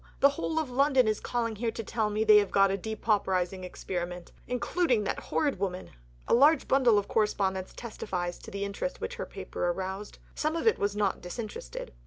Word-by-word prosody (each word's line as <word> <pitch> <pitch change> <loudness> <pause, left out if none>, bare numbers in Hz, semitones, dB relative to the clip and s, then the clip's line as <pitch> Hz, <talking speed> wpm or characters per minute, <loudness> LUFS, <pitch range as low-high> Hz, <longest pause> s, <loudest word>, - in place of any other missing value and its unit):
The 280 - +7
whole 320 +2 -3
of 310 -5 -1
London 265 -1 +4
is 215 -1 +1
calling 230 -3 -2
here 230 +2 0
to 225 0 -5
tell 220 0 -1
me 210 +1 0
they 215 -1 +8
have 205 - 0
got 195 -1 +4
a - - +1
depauperizing 195 -3 -1
experiment, 180 -1 -5 0.2
including 250 -1 +1
that - - -2
horrid 285 -10 -1
woman." 185 -2 -3 0.4
A - - +2
large 290 +6 +5
bundle 250 -5 +4
of 205 - 0
correspondence 190 -3 0
testifies 180 -6 -4
to - - -10
the 200 0 -3
interest 200 - -4
which 485 +1 -5
her - - -4
paper - - -4
aroused. 190 +3 -4 0.2
Some 310 +1 -1
of 330 - -2
it 450 - +4
was 200 0 0
not 205 -2 0
disinterested. 180 - -6
210 Hz, 195 wpm, -29 LUFS, 190-250 Hz, 0.4 s, they